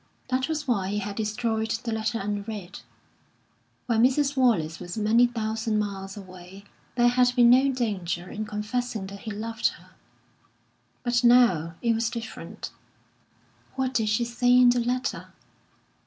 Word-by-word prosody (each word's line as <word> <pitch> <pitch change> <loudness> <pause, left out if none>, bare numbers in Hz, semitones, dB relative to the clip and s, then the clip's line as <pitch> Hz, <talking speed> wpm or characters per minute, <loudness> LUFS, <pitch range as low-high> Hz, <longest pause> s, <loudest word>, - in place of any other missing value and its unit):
That 260 +2 0
was 305 -2 -3
why 200 -7 +1
he 205 +2 -2
had 205 0 -4
destroyed 220 +1 -1
the 235 - -3
letter 220 +1 -1
unread. 205 -1 -5 1.1
When 230 -2 +2
Mrs. 275 +3 +3
Wallace 205 - +2
was 175 +3 -7
many 225 +3 +4
thousand 220 -1 -2
miles 195 -1 -4
away 185 0 -11 0.3
there 240 0 +4
had 250 0 +3
been 240 -1 +6
no 265 +2 +5
danger 185 -8 -2
in 215 +3 -5
confessing 215 0 -3
that 200 +1 -9
he 215 - -6
loved 220 +2 -1
her; - - -20 1.1
but 240 0 +1
now 235 -10 +4
it 235 -1 +3
was 225 0 0
different. 230 -1 -7 1.0
What 260 -1 -1
did 220 -3 +1
she 215 +3 +1
say 240 +1 +1
in 250 -1 +7
the 245 - +1
letter? 250 +2 -2
225 Hz, 150 wpm, -26 LUFS, 205-245 Hz, 1.1 s, in